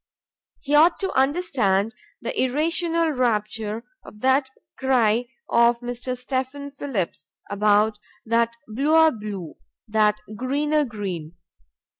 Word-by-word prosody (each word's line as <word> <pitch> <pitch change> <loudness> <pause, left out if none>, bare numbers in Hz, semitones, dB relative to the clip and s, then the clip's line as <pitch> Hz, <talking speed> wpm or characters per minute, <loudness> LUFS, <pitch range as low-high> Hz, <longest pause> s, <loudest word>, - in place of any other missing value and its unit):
He 290 -1 -3
ought 325 +3 +5
to 385 - -1
understand 260 - +1 0.3
the 235 - -3
irrational 330 +5 +1
rapture 220 -3 -1 0.2
of 210 - -14
that 265 +1 +3 0.3
cry 245 -3 +2 0.2
of 235 0 +4
Mr. 245 +1 -4
Stephen 265 +2 -3
Phillips 215 - -4 0.2
about 210 +1 +3 0.3
"that 230 +1 +1
bluer 310 +8 +4
blue, 205 - -7 0.3
that 210 -1 +2 0.2
greener 290 +5 +1
green." 185 - -5
245 Hz, 105 wpm, -23 LUFS, 210-285 Hz, 0.3 s, ought